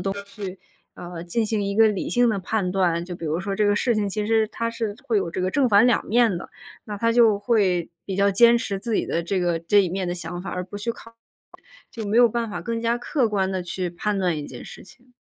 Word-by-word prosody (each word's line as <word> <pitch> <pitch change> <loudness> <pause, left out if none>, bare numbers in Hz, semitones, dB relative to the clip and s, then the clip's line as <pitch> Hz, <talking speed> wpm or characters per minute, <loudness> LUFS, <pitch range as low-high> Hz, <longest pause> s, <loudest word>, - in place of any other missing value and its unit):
东 195 +2 -2
西， 205 +1 -13 0.5
呃， 175 -1 -8
进 220 +6 -1
行 215 -1 -1
一 200 0 -2
个 225 0 +6
理 205 -3 -2
性 245 -1 +3
的 210 - 0
判 190 -1 -1
断。 175 -3 +1
就 175 0 -7
比 170 - -7
如 160 +2 -1
说 195 +1 -3
这 210 0 +2
个 205 - +3
事 235 +1 +1
情， 205 -1 0
其 210 +1 -3
实 225 -1 +3
它 230 +2 -3
是 225 -3 -4
会 225 -3 +2
有 170 -4 -1
这 185 - -3
个 185 - 0
正 265 +4 +2
反 210 +2 +5
两 245 - +2
面 225 -4 +3
的。 - - -9 0.3
那 210 -2 -6
他 230 +2 +1
就 225 -4 +4
会 195 -7 +1 0.2
比 190 - -4
较 200 +1 +3
坚 235 +4 +6
持 200 -4 -2
自 230 +3 -4
己 - - 0
的 170 - -1
这 185 +2 -1
个 175 -2 +1
这 200 +5 +4
一 180 - -1
面 185 0 -3
的 175 - -1
想 175 0 -6
法， - - -5
而 180 - -3
不 205 +3 -8
去 230 +3 -2
考 230 0 -15 0.8
就 225 -2 -6
没 210 +3 0
有 240 0 +7
办 230 0 -2
法 - - -5
更 230 -1 -3
加 235 +1 +1
客 245 0 0
观 195 -3 0
地 185 -1 -2
去 180 0 -3
判 200 +3 -2
断 180 -4 0
一 145 - -5
件 125 - -10
事 - - -11
情。 250 +4 -20
205 Hz, 285 characters per minute, -23 LUFS, 185-230 Hz, 0.8 s, 有